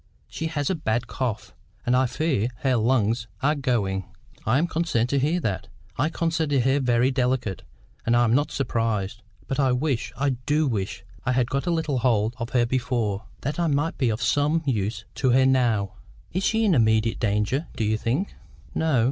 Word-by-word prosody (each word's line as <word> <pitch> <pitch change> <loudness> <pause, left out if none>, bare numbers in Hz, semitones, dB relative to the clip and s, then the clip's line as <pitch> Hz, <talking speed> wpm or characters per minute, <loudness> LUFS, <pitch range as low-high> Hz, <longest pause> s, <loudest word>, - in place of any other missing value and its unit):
She 160 - -4
has 145 -2 -1
a - - +2
bad 120 -7 -1
cough, 120 -5 -3 0.3
and 120 - +3
I 130 0 +3
fear 125 -3 0
her 130 -3 +2
lungs 115 -1 +1 0.2
are 150 +2 +4
going." 105 - 0 0.4
"I 115 +4 +4
am 160 - +2
concerned 160 -9 0
to 140 - +2
hear 155 +6 +1
that. 100 - -2 0.3
I 150 +5 +1
considered 160 -5 0
her 135 +2 +3
very 125 0 +2
delicate, 125 -7 0 0.4
and 115 - +2
am 120 -1 +4
not 145 +4 +2
surprised. 110 -6 -1 0.3
But 135 - -2
I 130 -2 +3
wish, 125 -2 -1
I 140 +1 +1 0.2
do 150 +1 +3
wish, 100 -4 -3 0.2
I 130 - +1
had 125 -1 +1
got 140 +5 -1
a - - +2
little 160 -5 0
hold 115 -2 +2
of 115 0 -3
her 125 -2 +2
before, 120 -5 -1 0.2
that 145 +6 -3
I 170 - +2
might 145 +2 0
be 130 -4 +2
of 110 +2 -2
some 150 +3 +2
use 105 -5 -1
to 130 - +1
her 130 +1 +5
now. 120 -7 +2 0.4
Is 185 - 0
she 225 +3 +2
in 200 - +4
immediate 110 -3 +3
danger, 105 +8 0
do - - -1
you 110 +1 +2
think?" 125 - -1 0.4
"No. 160 -6 +2
125 Hz, 190 wpm, -25 LUFS, 115-145 Hz, 0.4 s, her